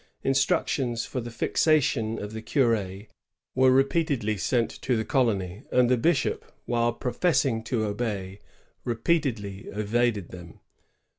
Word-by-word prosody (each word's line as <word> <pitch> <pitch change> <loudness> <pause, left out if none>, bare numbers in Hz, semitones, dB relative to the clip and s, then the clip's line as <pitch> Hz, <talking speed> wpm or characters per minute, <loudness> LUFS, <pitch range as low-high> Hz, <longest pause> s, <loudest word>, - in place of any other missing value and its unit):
Instructions 135 -2 +1
for 125 - -4
the 120 - -6
^^ - - -11 0.2
fixa 155 -1 +4
tion 115 -5 -1
" - - -6
of 105 +1 -7
the 110 - -5
cur^ 110 -5 0 0.5
were 130 0 +4
repeatedly 135 -4 +2
sent 115 +4 0
to 125 -3 +1
the 110 - -2
colony, 100 -8 0
and 125 -1 +3
the - - +6
bishop, 140 +6 0
while 120 0 +1
professing 125 -1 0
to 115 -2 -1
obey, 100 -3 -3 0.4
repeatedly 115 - -1
evaded 105 -1 0
them. 85 -2 -11
115 Hz, 140 wpm, -26 LUFS, 105-130 Hz, 0.5 s, the